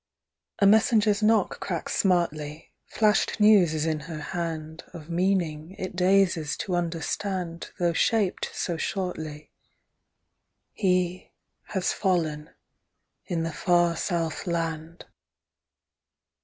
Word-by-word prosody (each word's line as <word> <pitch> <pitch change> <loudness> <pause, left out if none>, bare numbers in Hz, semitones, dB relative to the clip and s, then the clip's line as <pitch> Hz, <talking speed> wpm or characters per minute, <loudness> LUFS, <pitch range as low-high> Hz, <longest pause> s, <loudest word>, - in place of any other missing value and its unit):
A 200 - +3
messenger's 215 0 +4
knock 220 +1 +2
cracks - - -3
smartly, 155 -5 0 0.2
Flashed 215 0 +1
news 205 -7 +5
is 155 0 -1
in 155 -1 0
her 155 +1 -7
hand 160 -1 -5
Of 165 0 -9
meaning 175 -2 0
it 185 -1 -5
dazes 180 -4 +2
to 185 - -3
understand 175 +1 -3
Though 175 -1 +1
shaped 205 +1 +1
so 170 -2 -3
shortly: 160 -5 -4 1.2
He—has 185 0 -2
fallen—in 165 0 -4
the 165 -1 -3
far 175 -1 +2
South 165 0 -2
Land. 165 -1 -3
175 Hz, 100 wpm, -26 LUFS, 160-190 Hz, 1.2 s, news